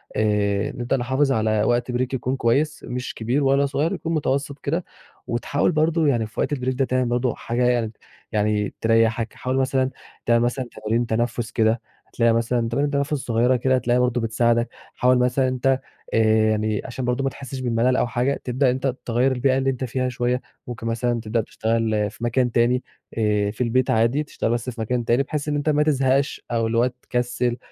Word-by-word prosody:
آآ، 105 -1 +1
نبدأ 125 +2 -1
نحافظ 130 +3 +1
على 110 -3 +1
وقت 120 +2 +1
بريك 125 +1 -1
يكون 130 0 -1
كويّس 140 +6 0
مش 125 0 -4
كبير 125 +6 -1
ولا 140 +1 +3
صغيّر 145 +4 0
يكون 165 - -3
متوسط 140 -2 -1
كده، 165 +5 -2 0.4
وتحاول 130 +7 0
برضه 160 0 +2
يعني 120 -6 +1
في 110 - -10
وقت - - 0
البريك 130 -2 -1
ده 135 +1 +1
تعمل 130 0 0
برضه 120 0 0
حاجة 120 +1 -2
يعني 120 -3 +1 0.4
يعني 105 -1 0
تريحك، 115 0 +2
حاول 130 +1 -2
مثلًا 130 0 +1 0.4
تعمل 115 0 +3
مثلًا 125 +2 -1
تمارين 110 +2 -1
تنفّس 115 +1 -1
كده 110 +1 +2 0.3
هتلاقيها 115 -1 +2
مثلًا 115 0 0
تمارين 140 +5 0
تنفس 140 +1 0
صغيّرة 125 -2 +1
كده 130 +2 +2
هتلاقيها 125 -1 +1
برضه 125 -1 +1
بتساعدك، 115 +1 +1 0.3
حاول 125 0 +3
مثلًا 125 +1 +2
ان 130 - 0
أنت 130 +1 +1 0.3
آآ، - - +3 0.3
يعني 110 0 0
عشان 130 0 -4
برضه 125 +2 0
ما 135 - +1
تحسِّش 135 0 -8
بالملل 125 0 +1
أو 125 - +1
حاجة 125 +3 -1
تبدأ 130 +1 +2
أنت 130 0 -1
تغيَّر 125 +3 +2
البيئة 130 +1 +2
اللي 135 0 +1
أنت 130 -1 -2
فيها 130 +1 -1
شويّة 125 0 -1 0.3
ممكن 115 -1 -5
مثلًا 120 +1 0
تبدأ 115 +1 0
تشتغل 110 -2 -1
في 110 - -12
مكان 120 +1 +1
تاني 120 +2 +2 0.3
آآ، 105 -2 +1
في 110 - -8
البيت 125 +1 +1
عادي 115 +6 +2
تشتغل 145 - -3
بس 120 +1 -1
في 120 -2 -6
مكان 120 +1 -1
تاني، 120 +4 +3
بحيث 145 +1 -4
ان 150 - 0
أنت 145 +1 0
ما 150 0 +3
تزهقش 135 -2 +1
أو 115 -1 +1
اللي 115 +1 -1
هو 120 - +4
تكسِّل 125 -1 -1
125 Hz, 195 wpm, -23 LUFS, 115-130 Hz, 0.4 s, هو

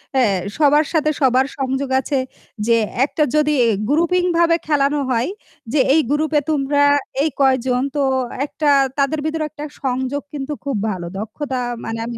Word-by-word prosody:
হ্যাঁ 235 -7 +3 0.2
সবার 300 0 +4
সাথে 305 -2 +2
সবার 260 0 +4
সংযোগ 265 0 -2
আছে 270 0 -1 0.5
যে 230 -1 +4 0.3
একটা 300 +2 -1
যদি 300 0 +3 0.4
গ্রুপিংভাবে 340 +2 +2
খেলানো 290 -1 +2
হয় 240 +3 0 0.4
যে 300 - +3
এই 315 - +5
গ্রুপে 305 +1 +2
তোমরা 285 -1 +2 0.4
এই 310 - +2
কয়জন 260 -2 +2
তো 290 - +1 0.4
একটা 300 +1 -3 0.3
তাদের 280 +2 +1
ভিতরে 315 0 -1
একটা 300 0 -8 0.2
সংযোগ 260 +2 -1
কিন্তু 290 0 -4
খুব 280 -2 -2
ভালো 185 -4 -4
দক্ষতা 260 +6 -4 0.3
মানে 225 0 -4
আমি 235 0 -5
285 Hz, 150 wpm, -19 LUFS, 260-305 Hz, 0.5 s, এই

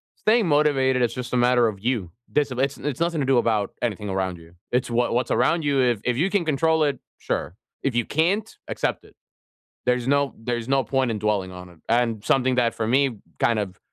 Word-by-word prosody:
staying 220 -3 +2
motivated, 135 -4 +3
it's 115 -1 +1
just 125 0 -6
a - - +2
matter 120 -1 +4
of 100 -3 -4
you. 115 -9 -1 0.2
Discip 140 -4 0
it's 140 0 0
it's 145 0 -4
nothing 170 -2 0
to - - 0
do 135 -1 +3
about 110 -4 +1
anything 105 -3 -2
around 95 -2 -2
you. 85 +1 -16 0.2
It's 125 0 0
wha 120 +1 +1
what's 120 +1 0
around 165 0 +2
you 140 -2 +1
if 120 -5 +1
if 125 -1 0
you 180 +6 +2
can 195 -5 0
control 160 +1 +2
it, 145 -1 0 0.2
sure. 90 - -3 0.3
If 135 -4 -1
you 120 - +1
can't, 180 +8 +1 0.2
accept - - -2
it. - - -20 0.7
There's 125 0 +1
no 140 0 +1
there's 120 +1 -3
no 135 -2 +2
point 130 0 0
in 110 - -2
dwelling 100 -3 -1
on 90 0 -10
it. 85 - -18
And 115 -2 +1
something 130 -1 +2
that 120 -2 +2
for 110 - -2
me 130 -2 +2 0.2
kind 115 -2 +2
of 95 -3 -4
125 Hz, 220 wpm, -24 LUFS, 110-140 Hz, 0.7 s, matter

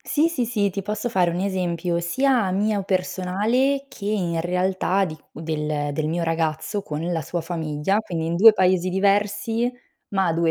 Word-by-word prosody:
Sì, 310 +2 +1
sì, 275 -8 -1
sì, 210 -4 +1
ti 200 +2 -4
posso 210 +4 -3
fare 185 -7 +2
un 170 - -3
esempio, 180 -3 -1
sia 235 +4 +1
mio 205 +1 0
personale 200 +9 0
che, 245 -6 -11
in 180 -6 0
realtà 185 +2 +1
di 155 -4 -6
del 150 -2 -3
del 155 +1 -1
mio 170 +1 -1
ragazzo, 165 +5 -1
con 150 -3 -5
la 165 -2 -1
sua 175 +4 -3
famiglia, 160 +2 -1
quindi 170 -7 -4
in 165 - -1
2 220 +5 +9
paesi 185 -2 +2
diversi, 205 +4 +1 0.4
ma 190 -4 +1
2 165 0 +2
185 Hz, 170 wpm, -23 LUFS, 165-210 Hz, 0.4 s, 2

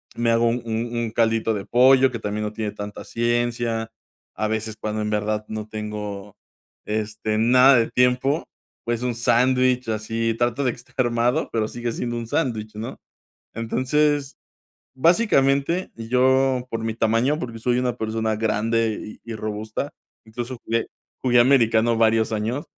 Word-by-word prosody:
Me 115 0 +1
hago 115 +1 +3
un 120 +1 -1
un 115 +1 -3
un 115 -2 -2
caldito 115 -1 +1
de 100 -2 -4
pollo 130 +2 +5
que 115 - -5
también 105 0 -3
no 105 - -4
tiene 105 -1 -3
tanta 105 0 -7
ciencia. 120 -1 -1 0.4
A 110 +2 -1
veces, 110 0 -3
cuando 110 0 -3
en 105 - -2
verdad 105 0 -1
no 110 0 -5
tengo, 105 -2 -6 0.5
este, 110 0 -2
nada 125 +4 +6
de 115 - +2
tiempo, 125 +4 +2 0.4
pues, 120 0 -2
un 125 -1 0
sándwich 125 +1 +2
así 115 +1 -1
trato 120 +3 +1
de 125 - +2
estar 125 0 -17
armado, 120 +5 +1
pero 110 -1 0
sigue 120 0 -4
siendo 120 -1 -3
un 115 - -4
sándwich, 110 -3 -2
¿no?, 110 +2 -6 0.6
entonces, 140 +5 0 0.6
básicamente, 160 - +2
yo 130 +2 +2
por 115 0 -2
mi 115 -1 -1
tamaño, 115 +6 +2
porque 115 -5 -6
soy 120 +2 +1
una 125 -1 -1
persona 110 -1 -1
grande 110 0 -1
y 115 - -8
y - - -4
robusta, 110 +6 -4 0.3
incluso 120 +3 -6
jugué 115 0 0 0.3
jugué 125 -2 +4
americano 115 -3 +4
varios 110 0 +3
años, 110 +6 -2
115 Hz, 155 wpm, -23 LUFS, 110-125 Hz, 0.6 s, nada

